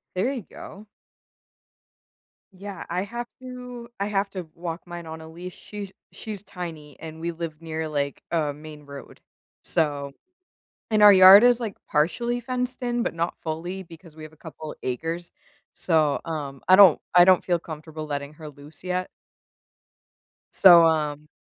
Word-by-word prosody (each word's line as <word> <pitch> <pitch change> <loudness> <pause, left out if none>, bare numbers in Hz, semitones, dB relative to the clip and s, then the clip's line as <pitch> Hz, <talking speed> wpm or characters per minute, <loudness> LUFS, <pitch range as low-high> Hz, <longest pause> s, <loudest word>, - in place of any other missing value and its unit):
There 195 +9 0
you 255 - -5
go. 210 +2 -11 1.7
Yeah, 195 -1 -8
I 180 +2 -1
have 235 +4 -6
to 250 -2 -9
I 200 - 0
have 200 -1 -1
to 180 -5 -7
walk 170 0 -6
mine 175 -1 -8
on 160 0 -8
a 160 - -11
leash, 175 +2 -9
she's 205 -2 -9 0.2
she's 210 -3 -8
tiny, 165 -7 -8
and 160 0 -9
we 170 +1 -3
live 165 -1 -7
near, 160 -1 -4
like, 140 -2 -3
a 155 -4 0
main 150 0 -12
road, 140 -1 -11 0.4
so 145 -3 -1 0.8
and 215 -1 +3
our 205 -1 +10
yard 190 +2 +10
is, 245 0 +5
like, 220 -4 -4
partially 235 +11 0
fenced 255 +1 -3
in, 240 -1 -1
but 250 - -2
not 170 +1 -2
fully 170 +4 -4
because 165 -2 -15
we 155 - -12
have 155 0 -10
a - - -26
couple 155 -1 -9
acres, 165 +7 -4 0.4
so, 155 -4 +1
um, 145 -4 -5
I 185 - +8
don't 190 -5 +7
I 175 0 +8
don't 185 -1 +5
feel 175 -2 +1
comfortable 155 -1 -8
letting 145 0 -5
her 155 -1 -10
loose 145 +3 -14
yet. 180 0 -2 1.5
So, 175 -3 +8
um 150 -2 0
170 Hz, 165 wpm, -24 LUFS, 155-195 Hz, 1.7 s, our